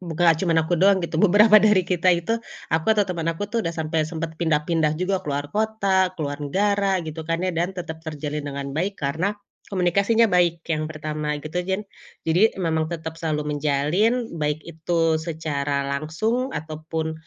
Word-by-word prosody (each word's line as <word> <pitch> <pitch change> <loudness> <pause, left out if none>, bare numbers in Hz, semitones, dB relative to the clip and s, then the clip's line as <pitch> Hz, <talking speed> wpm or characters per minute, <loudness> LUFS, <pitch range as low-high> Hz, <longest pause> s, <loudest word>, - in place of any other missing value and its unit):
buka 170 -2 -6
nggak 165 -2 +5
cuma 170 -3 +1
aku 160 +2 +1
doang, 190 -2 +4
gitu. 165 0 -2
Beberapa 210 +2 +7
dari 210 -3 +4
kita 180 0 +1
itu, 170 +6 -2 0.4
aku 160 0 +1
atau 205 - +4
temen 165 -1 -3
aku 165 +5 -2
tuh, 230 - +1
udah 170 -4 -3
sampe 160 0 -1
sempet 160 0 -5
pindah-pindah 155 -1 +1
juga. 185 +2 0
Keluar 145 -1 -3
kota, 200 -3 +2
keluar 145 -2 -4
negara, 195 +3 +1
gitu 160 +1 -6
kan, 165 +2 0
ya. 185 - 0
Dan 175 +3 -2
tetep 160 -2 -6
terjalin 150 -2 -4
dengan 140 -1 -5
baik, 185 +7 -2
karena 165 +9 -1 0.3
komunikasinya 200 +5 +3
baik, 170 -2 +2
yang 155 0 -1
pertama, 150 -1 -3
gitu. 160 +3 -2
Gian 190 +3 -2 0.4
jadi, 180 +7 +3
memang 160 -4 0
tetep 160 -1 -6
selalu 150 -2 -1
menjalin, 155 - +1
baik 150 +1 -1
itu 165 -1 0
secara 145 -4 -2
langsung 220 - -1
ataupun, 160 +1 -4
165 Hz, 170 wpm, -23 LUFS, 155-190 Hz, 0.4 s, Beberapa